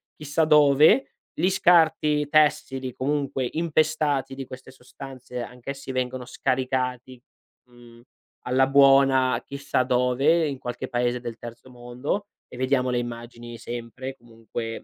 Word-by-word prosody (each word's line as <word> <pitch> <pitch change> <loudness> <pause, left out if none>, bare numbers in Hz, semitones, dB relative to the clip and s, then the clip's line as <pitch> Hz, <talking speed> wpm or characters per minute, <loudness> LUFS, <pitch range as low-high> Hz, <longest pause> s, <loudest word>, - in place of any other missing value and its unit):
chissà 155 +1 -1
dove. 150 - +5 0.3
Gli 185 - +3
scarti 155 -5 +3
tessili, 135 -4 +1
comunque 140 -1 -2
impestati 155 -4 0
di 135 0 -7
queste 130 0 -11
sostanze, 130 -1 -10
anch'essi 130 +3 -8
vengono 130 0 -3
scaricati, 130 -1 -2 0.5
mhmm, 120 -1 -17 0.5
alla 130 +1 +3
buona 135 -2 +4
chissà 140 -2 -1
dove, 130 +6 +2
in 140 -2 -4
qualche 125 -1 -6
Paese 120 0 -1
del 120 -1 -7
terzo 120 +2 -11
mondo, 125 +10 -4 0.2
e - - -12
vediamo 130 0 +1
le 125 - 0
immagini 120 0 -7
sempre, 120 +3 -7
comunque, 115 0 -7
130 Hz, 120 wpm, -24 LUFS, 125-140 Hz, 0.5 s, dove